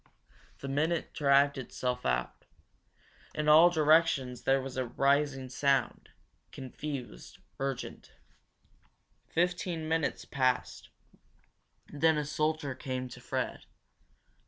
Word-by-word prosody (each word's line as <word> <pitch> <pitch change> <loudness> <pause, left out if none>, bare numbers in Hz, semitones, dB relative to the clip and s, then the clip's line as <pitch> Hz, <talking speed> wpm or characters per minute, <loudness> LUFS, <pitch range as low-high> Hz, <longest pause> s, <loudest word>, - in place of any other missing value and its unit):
The 140 - -5
minute 155 +5 -1
dragged 140 -1 +3
itself 125 0 -3
out. 60 0 -2 0.9
In 150 0 -2
all 160 +3 +8
directions 155 -6 +3
there 135 0 +4
was 135 -1 -6
a 130 -1 -2
rising 140 +1 +1
sound, 135 0 0 0.4
confused, 130 - -7 0.2
urgent. 135 -2 -5 1.2
Fifteen 175 -1 -1
minutes 160 -1 -1
passed. 130 -2 -1 1.0
Then 160 +2 +3
a 150 - -1
soldier 150 -1 -1
came 130 0 -5
to - - -11
Fred. - - -3
140 Hz, 100 wpm, -30 LUFS, 130-155 Hz, 1.2 s, all